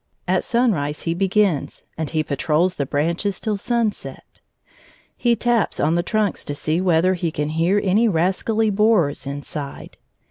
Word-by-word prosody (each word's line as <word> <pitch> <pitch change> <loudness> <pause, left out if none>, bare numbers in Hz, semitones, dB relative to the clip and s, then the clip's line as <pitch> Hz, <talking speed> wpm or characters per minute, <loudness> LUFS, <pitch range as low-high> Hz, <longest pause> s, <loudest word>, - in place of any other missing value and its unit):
At - - +1
sunrise 195 - 0
he 165 - 0
begins, 195 -3 0
and 160 -2 -3
he 155 -2 0
patrols 155 +4 +1
the 140 -5 -3
branches 170 +7 -1
till 215 -2 -1
sunset. 225 +1 -3 0.7
He 240 -1 +2
taps 235 -2 0
on 155 +2 +2
the 175 - +2
trunks 215 +3 -1
to 145 - -4
see 155 +4 -1
whether 180 0 +3
he 175 -2 -1
can 150 -1 -3
hear 165 +6 +2
any 210 +4 +3
rascally 210 +4 +1
borers 200 -10 +2
inside. 140 0 -7
180 Hz, 150 wpm, -21 LUFS, 155-210 Hz, 0.7 s, whether